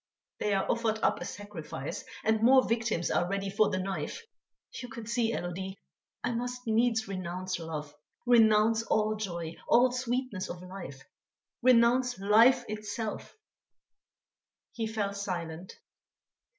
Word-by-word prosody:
They 205 -1 +1
are 195 - +1
offered 230 -2 +1
up - - +2
a - - -3
sacrifice, 170 -9 -6 0.2
and 220 0 +2
more 260 +3 +6
victims 225 -7 0
are 175 - +1
ready 200 0 -2
for 215 +1 +3
the 185 - -1
knife!... 185 - -4 0.6
You 245 - -7
can 230 -1 -8
see, 230 0 0
Élodie, 190 0 -4 0.5
I - - 0
must 245 +1 -4
needs 225 0 +2
renounce 185 -1 -4
love, 155 -3 -6 0.3
renounce 225 -2 +5
all 215 -1 +1
joy, 170 -6 -5
all 250 +1 +5
sweetness 250 -5 -2
of 175 +1 -7
life, 175 -8 -9 0.6
renounce 245 0 +4
life 230 +6 +5
itself." 215 - -5 1.3
He 225 -2 -3
fell 210 -2 -2
silent. 180 -3 -5
215 Hz, 130 wpm, -30 LUFS, 185-235 Hz, 1.3 s, more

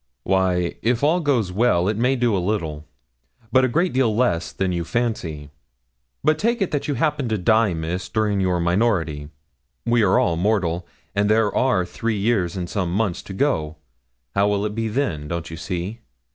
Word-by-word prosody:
'Why, 90 -2 +1
if 120 +2 +1
all 160 +5 +3
goes 130 - +1
well, 95 -3 +2
it 105 - +1
may 125 +5 +2
do 120 -4 +1
a 95 - 0
little; 80 -7 -2 0.6
but 130 +1 +5
a - - +4
great 170 +9 +1
deal 125 -5 +2
less 110 -8 +1
than 95 -1 -1
you 85 -1 -1
fancy. 85 -9 -3 0.7
But 155 +2 +3
take 235 +2 +1
it 195 - 0
that 145 - -2
you 145 - 0
happen 145 -5 0
to 110 - 0
die, 105 0 +3
Miss, 80 +3 -4
during 105 -3 0
your 90 -2 +1
minority. 85 -5 0 0.6
We 120 0 +3
are 100 -3 +4
all 85 -2 +2
mortal, 90 -3 0 0.3
and 100 +1 +1
there 110 -1 +3
are 115 -9 +2
three 110 +4 -2
years 100 -4 0
and 90 -1 -3
some 90 -2 -2
months 95 -2 0
to 95 - -9
go; 95 - 0 0.6
how 100 +1 +3
will 105 0 0
it 105 - -2
be 115 +1 -2
then? 105 - -2
Don't 85 +1 -4
you - - -5
see? 90 +7 -4
100 Hz, 190 wpm, -22 LUFS, 85-120 Hz, 0.7 s, but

